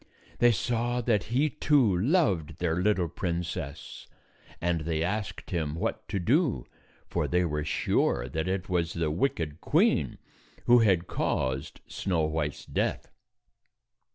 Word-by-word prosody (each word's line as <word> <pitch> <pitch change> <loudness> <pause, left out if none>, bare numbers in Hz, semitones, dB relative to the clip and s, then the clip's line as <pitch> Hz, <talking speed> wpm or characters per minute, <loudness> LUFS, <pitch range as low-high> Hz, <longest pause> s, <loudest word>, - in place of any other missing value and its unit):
They 120 0 +6
saw 120 +2 0
that 115 -3 +1
he, 130 +7 +2
too, 145 - +3
loved 95 - +1
their 85 -1 0
little 90 -2 +2
princess; 85 -4 -5 0.5
and 85 -1 0
they 80 0 -1
asked 105 +3 -3
him 80 -4 -1
what 85 - -3
to - - -2
do, 130 - +1 0.4
for - - -1
they 90 0 +2
were 75 -2 -2
sure - - +1
that 80 +6 -3
it 95 0 -2
was 85 -2 0
the 80 -2 -1
wicked 80 - -1
queen - - +2 0.5
who 120 0 +7
had 95 -6 +3
caused 65 -4 -2
Snow 90 -5 -1
White's 75 -2 -2
death. - - -2
90 Hz, 135 wpm, -28 LUFS, 80-115 Hz, 0.5 s, who